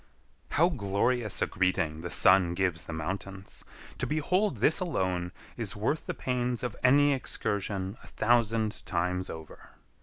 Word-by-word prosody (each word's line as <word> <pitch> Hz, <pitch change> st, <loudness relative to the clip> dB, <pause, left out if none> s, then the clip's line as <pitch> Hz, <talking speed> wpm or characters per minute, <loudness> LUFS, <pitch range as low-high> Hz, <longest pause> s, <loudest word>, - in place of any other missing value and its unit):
How 170 Hz, +3 st, +4 dB
glorious 115 Hz, -, 0 dB
a -, -, +3 dB
greeting 90 Hz, -4 st, 0 dB
the 85 Hz, -, -5 dB
sun 90 Hz, -1 st, +4 dB
gives 90 Hz, -2 st, -1 dB
the -, -, -6 dB
mountains! 95 Hz, +4 st, -5 dB, 0.4 s
To -, -, 0 dB
behold 155 Hz, -, +1 dB
this 135 Hz, +9 st, +3 dB
alone 95 Hz, -, -1 dB, 0.3 s
is 110 Hz, -5 st, -4 dB
worth 110 Hz, +9 st, -1 dB
the -, -, -2 dB
pains 125 Hz, -1 st, -1 dB
of 125 Hz, -3 st, -3 dB
any 145 Hz, +3 st, +5 dB
excursion 100 Hz, -6 st, -2 dB
a -, -, -14 dB
thousand 115 Hz, -1 st, +1 dB
times 90 Hz, +1 st, -1 dB
over. 80 Hz, -1 st, -10 dB
100 Hz, 145 wpm, -29 LUFS, 90-125 Hz, 0.4 s, any